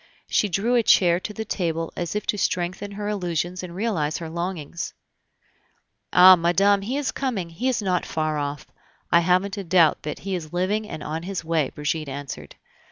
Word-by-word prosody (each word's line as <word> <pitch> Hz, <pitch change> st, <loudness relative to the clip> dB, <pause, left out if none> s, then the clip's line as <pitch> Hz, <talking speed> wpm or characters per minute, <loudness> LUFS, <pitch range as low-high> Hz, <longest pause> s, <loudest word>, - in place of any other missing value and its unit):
She 210 Hz, -, +2 dB
drew 205 Hz, +7 st, 0 dB
a 240 Hz, -, +5 dB
chair 175 Hz, -5 st, +4 dB
to 200 Hz, -, -6 dB
the 220 Hz, +1 st, -5 dB
table 165 Hz, -5 st, -2 dB
as 175 Hz, +1 st, -3 dB
if 210 Hz, -, -2 dB
to 210 Hz, -, 0 dB
strengthen 185 Hz, +3 st, -2 dB
her 205 Hz, +1 st, -4 dB
illusions 180 Hz, -3 st, -2 dB
and 175 Hz, -2 st, -8 dB
realize 180 Hz, -8 st, -1 dB
her 165 Hz, -2 st, -6 dB
longings. 170 Hz, -2 st, -4 dB, 1.2 s
"Ah! 185 Hz, +1 st, +9 dB
madame, 195 Hz, +4 st, +3 dB
he 245 Hz, +8 st, -2 dB
is 290 Hz, -2 st, -1 dB
coming. 210 Hz, -11 st, -3 dB
He 245 Hz, +11 st, -1 dB
is 245 Hz, -4 st, -1 dB
not 180 Hz, -2 st, +1 dB
far 155 Hz, -1 st, -1 dB
off.... 145 Hz, -1 st, -4 dB, 0.5 s
I 170 Hz, -, +7 dB
haven't 185 Hz, +3 st, +1 dB
a 200 Hz, -, -3 dB
doubt 170 Hz, -3 st, +4 dB
that 150 Hz, -, -5 dB
he 195 Hz, 0 st, -5 dB
is 165 Hz, -4 st, -5 dB
living 205 Hz, +4 st, 0 dB
and 155 Hz, -, -6 dB
on 155 Hz, +2 st, -4 dB
his 185 Hz, -1 st, -5 dB
way," 160 Hz, -4 st, +1 dB
Brigitte 150 Hz, 0 st, -3 dB
answered. 135 Hz, -, -7 dB
180 Hz, 190 wpm, -24 LUFS, 165-200 Hz, 1.2 s, Ah